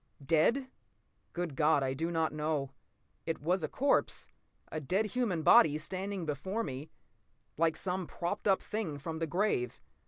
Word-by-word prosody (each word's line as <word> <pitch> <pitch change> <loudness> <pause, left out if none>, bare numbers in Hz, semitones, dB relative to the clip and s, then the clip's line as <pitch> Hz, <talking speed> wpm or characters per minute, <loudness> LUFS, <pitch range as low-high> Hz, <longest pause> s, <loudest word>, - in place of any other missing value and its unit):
Dead? 170 - +3 0.6
Good 175 -5 -3
God, 150 -1 +3
I 130 0 0
do 165 +5 -2
not 160 -2 0
know. 150 -3 -1 0.6
It 165 - -1
was 175 +5 +1
a 155 - -1
corpse, 280 +2 +1 0.4
a 155 - -2
dead 190 +10 +1
human 215 -8 -1
body, 150 -1 +7
standing 190 +3 -3
before 190 +9 -2
me 135 +2 -6 0.7
like 160 0 +2
some 185 -2 -1
propped 180 +5 -3
up 195 -1 +3
thing 210 -9 -3
from 160 +3 -5
the 165 - -1
grave. 175 - 0
165 Hz, 155 wpm, -32 LUFS, 150-190 Hz, 0.7 s, body